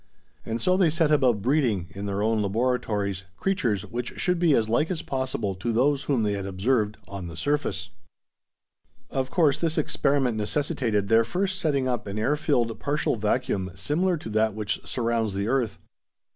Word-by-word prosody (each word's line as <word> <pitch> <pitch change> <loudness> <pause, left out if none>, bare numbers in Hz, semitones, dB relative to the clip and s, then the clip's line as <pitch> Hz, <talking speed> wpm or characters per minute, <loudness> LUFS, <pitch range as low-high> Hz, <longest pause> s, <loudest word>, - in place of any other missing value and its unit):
And 115 +1 -2
so 185 +4 +2
they 185 -4 +4
set 160 -1 +2
about 125 -8 +3
breeding, 120 - +2
in 100 +1 -6
their 100 +1 -1
own 110 0 +2
laboratories, 105 -3 -1
creatures 120 - 0
which 120 +1 -5
should 180 -1 +1
be 165 -5 +4
as 110 -2 +2
like 120 +8 +1
as 180 -4 -3
possible 130 -7 -2
to 95 +6 -3
those 135 +5 +2
whom 130 -6 +1
they 105 - +1
had 100 -1 -3
observed 105 +2 0
on 95 -3 -6
the 85 -1 -9
surface. 145 +10 -1 1.2
Of 130 -1 -1
course, 155 -5 +3
this 165 -2 0
experiment 140 -5 +1
necessitated 115 -3 0
their 115 +2 +5
first 190 - -1
setting 140 -6 +1
up 120 -3 -2
an 100 +1 -4
air 120 +7 +2
filled 125 -7 0
partial 145 -2 0
vacuum 105 -3 0
similar 170 - 0
to 150 - -8
that 110 0 +1
which 105 0 -2
surrounds 115 -4 -1
the 100 +1 -1
earth. 125 -3 0
120 Hz, 175 wpm, -26 LUFS, 105-145 Hz, 1.2 s, their